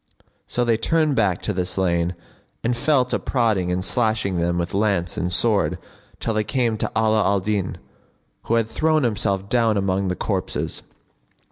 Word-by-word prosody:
So 120 - 0
they 115 -2 +2
turned 155 +4 +1
back 100 -7 +1
to 105 - -1
the 90 -1 0
slain 90 -1 0 0.5
and 120 +1 +1
fell 130 +1 +2
to 125 - -1
prodding 110 -8 0
and 90 +1 -1
slashing 110 -4 0
them 85 +1 0
with 85 0 -2
lance 100 -4 0
and 90 +1 -2
sword 105 +2 +2 0.4
till 115 - -1
they 110 0 +1
came 115 +1 0
to - - -2
Ala 110 -1 +3
al 100 +1 +2
Din, 100 0 -2 0.7
who 115 - +1
had 115 -1 +2
thrown 155 +5 +1
himself 100 -4 0
down 115 -2 +2
among 95 0 0
the 90 - -1
corpses. - - -2
105 Hz, 170 wpm, -22 LUFS, 95-115 Hz, 0.7 s, Ala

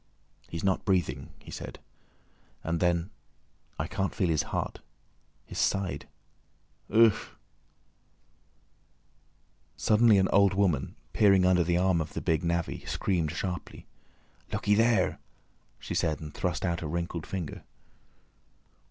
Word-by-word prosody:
"He's 85 -1 -5
not 95 -1 +1
breathing," 75 - 0
he - - -13
said, - - -7 0.9
and 85 +1 -1
then, 85 +2 +1 0.7
"I - - -1
can't 95 0 -2
feel 95 -4 +1
his 80 -3 +2
heart. - - -3 0.7
His - - -6
side—ugh!" 105 +3 0 2.6
Suddenly 110 -1 +5
an 95 -1 +3
old 100 -1 +4
woman, 85 -10 +1 0.2
peering 100 -3 +5
under 90 -1 +4
the 85 +1 +1
arm 90 -2 +2
of 80 - -6
the - - -3
big 80 +2 +1
navvy, 85 -1 -1
screamed 85 -5 0
sharply. 90 -1 -5 0.7
"Looky 105 - +1
there!" 115 -2 +3 0.6
she - - -6
said, 75 -1 0
and 75 -2 -8
thrust 90 +1 -2
out 85 -2 -1
a 80 - -3
wrinkled 85 0 -3
finger. 90 -6 -5
90 Hz, 120 wpm, -29 LUFS, 85-100 Hz, 2.6 s, Suddenly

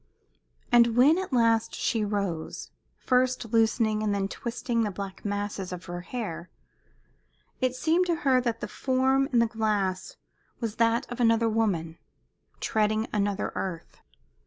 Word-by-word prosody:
And 235 -1 +5
when 295 +8 +6
at 380 - -5
last 230 -3 +2
she 225 -2 0
rose, 200 -6 -3 0.3
first 255 -3 0
loosening 225 -1 +2
and 210 -1 0
then 195 -1 0
twisting 235 +2 -3
the 215 - 0
black 195 -1 -7
masses 205 -2 -3
of 180 0 -7
her 175 0 -6
hair, 180 -5 -5 1.1
it 255 -1 0
seemed 330 +7 +2
to 340 - +2
her 260 -2 +4
that 235 -2 -2
the - - -3
form 265 +1 +1
in 245 - +2
the 230 - +5
glass 210 -4 -1 0.4
was 230 -3 -4
that 230 0 +2
of 245 - -6
another 230 -1 +3
woman, 190 -8 -1 0.6
treading 215 0 0
another 205 -1 0
earth. 170 -4 -5
225 Hz, 145 wpm, -27 LUFS, 200-245 Hz, 1.1 s, when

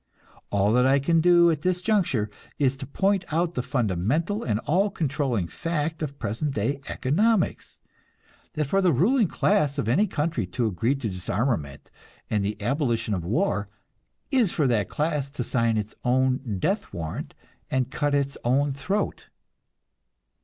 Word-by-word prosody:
All 100 +1 +2
that 125 +1 +4
I 135 +1 +5
can 165 +4 +2
do 175 0 +6
at 155 -2 -2
this 180 +1 +1
juncture 175 - +1 0.3
is 135 -2 +2
to 135 - -7
point 195 +6 +1
out 170 +2 +1
the 125 - -1
fundamental 125 - 0
and 105 -3 0
all 190 +9 +2
controlling 135 - -1
fact 160 - -3
of 140 -2 -4
present 135 +7 -3
day 120 +7 -1
economics: 200 - 0 0.8
that 150 - -1
for 195 +8 +1
the 180 -2 +4
ruling 210 - +3
class 155 -7 +1
of 140 - -1
any 190 - +3
country 150 - -1
to 125 +5 -1
agree 115 +6 0
to 135 -4 -3
disarmament 95 - -2 0.4
and 105 -2 +1
the 105 +1 -3
abolition 120 -2 0
of 90 -4 -2
war, 105 - 0 0.6
is 245 -9 +3
for 150 - +1
that 115 -6 +1
class 150 -2 -1
to 140 -3 -4
sign 115 -2 +1
its 105 0 -3
own 130 -3 +1
death 200 - -1
warrant 80 -2 -5 0.3
and 130 0 0
cut 145 -1 0
its 140 -1 -1
own 135 +3 +2
throat. 190 +10 -2
140 Hz, 160 wpm, -25 LUFS, 115-165 Hz, 0.8 s, do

